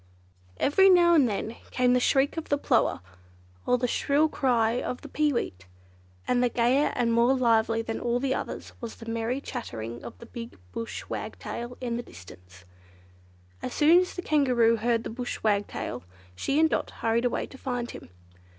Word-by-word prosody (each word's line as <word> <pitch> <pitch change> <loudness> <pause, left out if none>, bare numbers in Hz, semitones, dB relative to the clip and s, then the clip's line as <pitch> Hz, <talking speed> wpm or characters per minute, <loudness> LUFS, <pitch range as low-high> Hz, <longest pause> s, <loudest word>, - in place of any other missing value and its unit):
Every 385 +7 +5
now 350 -2 +6
and 285 -7 +5
then 220 +2 -4
came 250 -1 +2
the 250 - +4
shriek 270 +3 +2
of 325 -1 -5
the 285 - +2
plover, 255 - +1 0.7
or 250 - +4
the 250 0 0
shrill 290 +5 +2
cry 240 -4 +1
of 250 - -4
the - - -9
peeweet; 235 - -1 0.6
and 245 - +2
gayer 250 +5 +3
and 235 -2 +1
more 235 +3 +4
lively 225 -2 +2
than 225 0 -4
all 240 0 0
others - - -5
was 235 -2 -6
the 230 - -11
merry 230 +3 -2
clattering 120 - -6
of - - -9
the - - -12
big 230 0 -9
bush 230 - -5
wagtail 240 +1 -6
in 240 -2 -2
the - - -3
distance. 90 - -14 1.0
As - - -5
soon 320 +4 +6
as 365 0 -2
the 355 - -5
Kangaroo 250 -8 +3
heard 230 +1 0
the - - -5
Bush 245 +1 -5
Wagtail, 205 - -1 0.3
she 275 - 0
and 320 - +6
Dot - - -1
hurried 230 +2 0
away 245 - 0
to 265 - -13
find 245 -2 -3
him. - - -11
240 Hz, 175 wpm, -27 LUFS, 225-270 Hz, 1.0 s, now